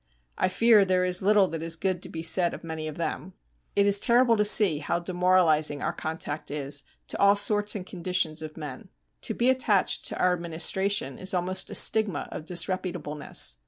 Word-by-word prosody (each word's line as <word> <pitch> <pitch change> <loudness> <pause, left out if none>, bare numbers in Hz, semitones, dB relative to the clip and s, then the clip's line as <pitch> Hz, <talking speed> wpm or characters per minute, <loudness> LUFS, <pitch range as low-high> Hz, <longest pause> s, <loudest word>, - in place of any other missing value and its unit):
I - - 0
fear 225 +1 +4
there 185 -1 +1
is 180 0 0
little 200 0 +3
that 165 -1 -5
is 165 0 +1
good 185 +1 -2
to - - -6
be 160 0 -7
said 175 +1 +3
of - - -13
many 160 -1 -6
of 155 - -8
them. 175 +2 -5 0.4
It 200 - +3
is 200 0 +4
terrible 240 +1 +3
to 210 - +2
see 205 -6 +5
how 155 +3 -2
demoralizing 175 -4 +1
our - - -2
contact 155 -1 -5
is 145 -1 -4 0.3
to - - -3
all 200 0 +5
sorts 205 0 +1
and 190 -3 -6
conditions 180 -3 0
of 155 0 -9
men. 145 -5 -9 0.3
To - - -2
be 245 +2 +2
attached 220 -7 +1
to - - -2
our 180 0 +2
Administration 170 -2 -1
is 185 0 -2
almost 185 +1 -2
a - - -7
stigma 220 -3 +2
of 155 - -8
disreputableness. 170 - -1
180 Hz, 195 wpm, -26 LUFS, 160-200 Hz, 0.4 s, see